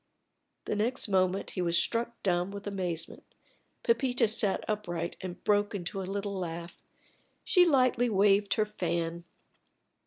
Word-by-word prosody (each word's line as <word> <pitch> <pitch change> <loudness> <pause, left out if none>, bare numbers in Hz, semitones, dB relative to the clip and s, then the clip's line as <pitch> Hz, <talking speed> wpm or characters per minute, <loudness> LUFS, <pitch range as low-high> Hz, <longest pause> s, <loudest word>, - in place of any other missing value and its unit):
The - - -1
next 230 +5 0
moment 185 0 +1
he 185 - -3
was 170 -1 +2
struck 235 +7 0
dumb 180 -1 +1
with 200 0 -8
amazement. 180 -5 -4 0.6
Pepita 245 0 +2
sat 210 -2 0
upright 175 -5 -3
and 180 -1 -7
broke 205 0 +2
into 195 +1 -4
a 185 - -5
little 200 0 -3
laugh. 170 -1 -6 0.6
She 360 -1 +5
lightly 255 -4 +3
waved 200 0 +3
her 215 - +2
fan. 170 -4 -3
200 Hz, 135 wpm, -30 LUFS, 175-215 Hz, 0.6 s, She